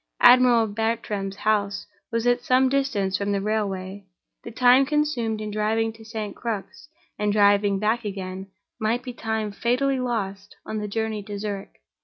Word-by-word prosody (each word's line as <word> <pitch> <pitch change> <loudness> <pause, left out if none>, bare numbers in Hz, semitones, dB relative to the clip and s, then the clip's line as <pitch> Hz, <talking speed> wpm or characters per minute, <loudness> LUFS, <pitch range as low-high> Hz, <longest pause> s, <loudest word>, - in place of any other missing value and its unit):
Admiral 245 -2 +7
Bartram's 210 -2 -2
house 205 -1 0 0.3
was 230 0 -1
at 245 0 +3
some 255 +1 +3
distance 210 -9 0
from 200 0 -1
the 200 - +1
railway; 200 -2 -2 0.4
the - - -7
time 250 +3 +5
consumed 270 -7 0
in 215 0 -5
driving 220 +2 0
to 225 0 -14
St. 220 -2 -5
Crux, 230 +6 -5 0.3
and 210 0 +1
driving 205 -1 +4
back 220 +4 0
again, 190 -2 -5 0.3
might 230 +3 0
be 250 - -6
time 220 -2 -2
fatally 255 +5 0
lost 205 -6 -3
on 215 - -3
the 210 - -3
journey 220 0 -2
to 205 0 -7
Zurich. 200 -1 -6
215 Hz, 160 wpm, -24 LUFS, 200-240 Hz, 0.4 s, Admiral